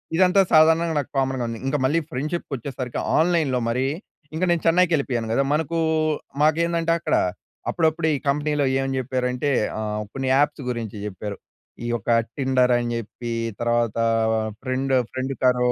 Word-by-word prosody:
ఇదంతా 185 Hz, +2 st, +5 dB
సాధారణంగా 160 Hz, +1 st, +5 dB
నాకు 140 Hz, -, -4 dB
కామన్‌గా 135 Hz, -2 st, 0 dB
ఉంది. 115 Hz, -1 st, -5 dB
ఇంకా 140 Hz, +2 st, +1 dB
మళ్ళీ 155 Hz, +5 st, +2 dB
ఫ్రెండ్షిప్‌కొచ్చేసరికి 135 Hz, -4 st, -4 dB, 0.2 s
ఆన్‍లైన్‍లో 160 Hz, -6 st, +2 dB
మరి 125 Hz, +3 st, 0 dB, 0.5 s
ఇంక 170 Hz, -, -2 dB
నేను 170 Hz, -2 st, +1 dB
చెన్నైకి 175 Hz, +1 st, +4 dB
వెళ్ళిపోయాను 125 Hz, -7 st, -1 dB
కదా! 135 Hz, -, +3 dB
మనకు 160 Hz, +2 st, -1 dB, 0.6 s
మాకేందంటే 165 Hz, +2 st, +2 dB
అక్కడ -, -, 0 dB, 0.5 s
అప్పుడప్పుడు 160 Hz, -1 st, +1 dB
ఈ -, -, -1 dB
కంపెనీలో 145 Hz, 0 st, +1 dB, 0.2 s
ఏం 135 Hz, -, -2 dB
చెప్పారంటే 125 Hz, +1 st, -1 dB, 0.3 s
ఆహ్ 105 Hz, 0 st, -2 dB
కొన్ని 135 Hz, -1 st, -3 dB
యాప్స్ 145 Hz, 0 st, +2 dB
గురించి 115 Hz, -4 st, -4 dB
చెప్పారు. 105 Hz, 0 st, -5 dB, 0.5 s
ఈ -, -, -2 dB
యొక్క 120 Hz, -1 st, -3 dB, 0.3 s
టిండర్ 130 Hz, -2 st, +2 dB
అని 120 Hz, 0 st, -2 dB
చెప్పి 115 Hz, +1 st, -6 dB, 0.3 s
తర్వాత 120 Hz, -2 st, +1 dB, 0.7 s
ఫ్రెండ్ 130 Hz, +1 st, -2 dB, 0.2 s
ఫ్రెండ్ 130 Hz, +1 st, -3 dB
కరో 125 Hz, -1 st, +3 dB
135 Hz, 140 wpm, -23 LUFS, 125-160 Hz, 0.7 s, ఇదంతా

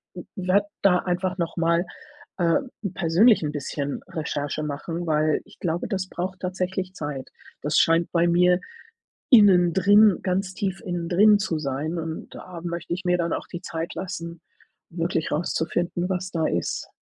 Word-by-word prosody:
w -, -, -7 dB
werde 190 Hz, +1 st, +2 dB, 0.2 s
da 180 Hz, -2 st, +5 dB
einfach 185 Hz, +1 st, -2 dB
nochmal, 170 Hz, +1 st, +1 dB, 0.5 s
äh, 170 Hz, -2 st, +3 dB, 0.4 s
persönlich 190 Hz, +5 st, +4 dB
'n 150 Hz, -, -1 dB
bisschen 145 Hz, 0 st, -4 dB
Recherche 150 Hz, -3 st, -3 dB
machen, 165 Hz, +4 st, -4 dB
weil 155 Hz, 0 st, +2 dB
ich -, -, -19 dB
glaube, 170 Hz, -1 st, -2 dB
das 190 Hz, -3 st, -3 dB
braucht 185 Hz, +1 st, -5 dB
tatsächlich 185 Hz, 0 st, -3 dB
Zeit. 145 Hz, -6 st, -5 dB, 0.3 s
Das 150 Hz, +2 st, 0 dB
scheint 165 Hz, +1 st, +3 dB
bei 170 Hz, 0 st, +3 dB
mir 180 Hz, +1 st, +4 dB, 0.7 s
innendrin 200 Hz, -, +6 dB
ganz 190 Hz, +1 st, -1 dB
tief 190 Hz, -1 st, -3 dB
innendrin 180 Hz, +4 st, +3 dB
zu 165 Hz, -6 st, -1 dB
sein, 150 Hz, +4 st, -3 dB
und 160 Hz, 0 st, -5 dB
da 175 Hz, -2 st, -9 dB
möchte 170 Hz, -1 st, -4 dB
ich 185 Hz, +2 st, -4 dB
mir 180 Hz, 0 st, +3 dB
dann 170 Hz, -1 st, -1 dB
auch -, -, -4 dB
die 175 Hz, -, -6 dB
Zeit 165 Hz, 0 st, -5 dB
lassen, 170 Hz, -3 st, -6 dB, 0.5 s
wirklich 165 Hz, -1 st, -1 dB
rauszufinden, 175 Hz, +2 st, -1 dB
was 185 Hz, 0 st, -2 dB
da 160 Hz, -2 st, 0 dB
ist. 85 Hz, -, -2 dB
175 Hz, 150 wpm, -24 LUFS, 165-185 Hz, 0.7 s, innendrin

